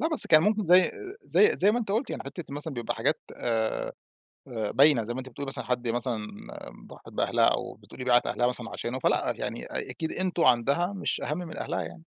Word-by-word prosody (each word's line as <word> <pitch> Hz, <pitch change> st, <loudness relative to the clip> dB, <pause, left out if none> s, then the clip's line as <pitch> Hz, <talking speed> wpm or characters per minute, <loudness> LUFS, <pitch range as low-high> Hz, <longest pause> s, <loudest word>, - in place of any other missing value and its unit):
لأ، 320 Hz, -, +1 dB
بس 315 Hz, -5 st, +7 dB
كان 155 Hz, 0 st, +6 dB
ممكن 210 Hz, +1 st, +2 dB
زي 180 Hz, +1 st, +5 dB, 0.3 s
زي 430 Hz, +1 st, +3 dB
زي 200 Hz, -, +4 dB
ما 240 Hz, -, +1 dB
أنتِ 220 Hz, -4 st, -4 dB
قُلتِ 225 Hz, +5 st, 0 dB
يعني -, -, -4 dB
حِتّة 145 Hz, +5 st, -7 dB
مثلًا 145 Hz, 0 st, -3 dB
بيبقى 120 Hz, -2 st, -3 dB
حاجات -, -, 0 dB, 0.2 s
آآ 110 Hz, -2 st, -1 dB, 0.6 s
آآ 110 Hz, -4 st, -3 dB
باينة 140 Hz, -3 st, +4 dB
زي 120 Hz, -, -4 dB
ما -, -, -5 dB
أنتِ 130 Hz, -, -9 dB
بتقولي 140 Hz, +3 st, -7 dB
مثلًا 135 Hz, -, -4 dB
حد 125 Hz, -1 st, -2 dB
مثلًا 120 Hz, 0 st, -1 dB, 0.7 s
ضحِت -, -, -14 dB
بأهلها، -, -, +1 dB
أو -, -, +1 dB
بتقولي 125 Hz, -, -10 dB
باعِت 125 Hz, -1 st, +4 dB
أهلها 120 Hz, -, 0 dB
مثلًا 125 Hz, -2 st, -3 dB
عشانه، 125 Hz, +2 st, -4 dB
فلأ، -, -, +1 dB
يعني -, -, -5 dB
أ -, -, -4 dB
أكيد 160 Hz, -, -4 dB
أنتم 180 Hz, -2 st, -1 dB
عندها 140 Hz, +10 st, +3 dB
مش 195 Hz, -, -2 dB
أهمّ 150 Hz, +3 st, -3 dB
من 175 Hz, -3 st, -7 dB
أهلها -, -, -3 dB
يعني. 80 Hz, 0 st, -10 dB
140 Hz, 215 wpm, -27 LUFS, 120-180 Hz, 0.7 s, بس